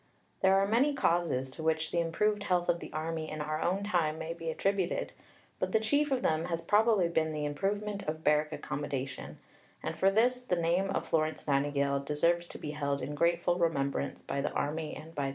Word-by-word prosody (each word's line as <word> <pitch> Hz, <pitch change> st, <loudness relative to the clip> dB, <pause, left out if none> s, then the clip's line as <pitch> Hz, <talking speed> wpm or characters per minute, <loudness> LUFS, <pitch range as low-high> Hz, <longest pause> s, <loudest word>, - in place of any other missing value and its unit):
There 190 Hz, 0 st, +5 dB
are 195 Hz, -, +4 dB
many 260 Hz, +7 st, +3 dB
causes 165 Hz, -, +1 dB
to 160 Hz, -, -8 dB
which 160 Hz, 0 st, 0 dB
the 170 Hz, -, +1 dB
improved 205 Hz, +6 st, +1 dB
health 180 Hz, -3 st, +1 dB
of 170 Hz, -, +2 dB
the -, -, -9 dB
Army 160 Hz, 0 st, -3 dB
in 155 Hz, -, -5 dB
our 155 Hz, +1 st, -2 dB
own 190 Hz, +3 st, 0 dB
time 170 Hz, -6 st, +1 dB
may 160 Hz, +1 st, -4 dB
be 165 Hz, -1 st, -5 dB
attributed, 190 Hz, +2 st, 0 dB, 0.5 s
but -, -, -1 dB
the 220 Hz, -, +5 dB
chief 285 Hz, +7 st, +1 dB
of 260 Hz, -2 st, +1 dB
them 160 Hz, +1 st, +1 dB
has 170 Hz, -1 st, -3 dB
probably 210 Hz, -3 st, +4 dB
been 160 Hz, -2 st, 0 dB
the 150 Hz, -1 st, -2 dB
improvement 200 Hz, +7 st, -2 dB
of 155 Hz, +1 st, -3 dB
barrack 150 Hz, +1 st, +3 dB
accommodation, 135 Hz, -3 st, -4 dB, 0.5 s
and -, -, -3 dB
for 190 Hz, -, +4 dB
this 245 Hz, +5 st, +2 dB
the 245 Hz, -8 st, 0 dB
name 175 Hz, +3 st, +1 dB
of 195 Hz, -, -2 dB
Florence 155 Hz, -1 st, 0 dB
Nightingale 140 Hz, 0 st, +1 dB
deserves 170 Hz, +5 st, +1 dB
to -, -, -9 dB
be 150 Hz, -, -5 dB
held 140 Hz, -2 st, -2 dB
in 145 Hz, +3 st, -4 dB
grateful 170 Hz, +3 st, +2 dB
remembrance 140 Hz, -4 st, 0 dB
by 140 Hz, -, -2 dB
the -, -, 0 dB
Army 155 Hz, +1 st, -2 dB
and 160 Hz, +1 st, -10 dB
by 145 Hz, -, -3 dB
the 140 Hz, -, 0 dB
nation. -, -, -1 dB
165 Hz, 210 wpm, -31 LUFS, 150-195 Hz, 0.5 s, There